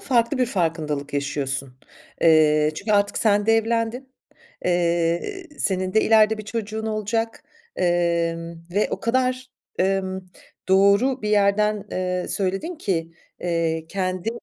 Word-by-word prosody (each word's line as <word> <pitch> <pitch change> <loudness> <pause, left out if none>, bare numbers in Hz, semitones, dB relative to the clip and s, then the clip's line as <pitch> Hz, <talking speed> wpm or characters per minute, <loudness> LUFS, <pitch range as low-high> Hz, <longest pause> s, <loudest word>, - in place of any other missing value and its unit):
farklı 240 0 +1
bir 250 - +2
farkındalık 155 -7 -2
yaşıyorsun. 140 -2 -2 0.5
Eee, 155 -2 +5
çünkü 205 +7 -2
artık 200 0 +2
sen 205 -1 +2
de 225 - +5
evlendin. 230 +3 0 0.5
Eee, 175 - 0
senin 185 -1 -1
de 220 - +5
ileride 220 -1 +4
bir 215 - -7
çocuğun 220 0 -4
olacak, 220 +1 -2 0.3
emm, 170 -1 0 0.2
ve 205 - +2
o - - -3
kadar, 255 +2 0 0.3
emm, 190 0 0 0.5
doğru 200 +7 +4
bir 210 - -2
yerden, 210 0 +2
eee, 180 -1 -2
söyledin 195 - -2
ki, 165 - -2 0.3
eee, 165 -2 -1
kendi 185 +1 -2
195 Hz, 125 wpm, -23 LUFS, 170-220 Hz, 0.5 s, Eee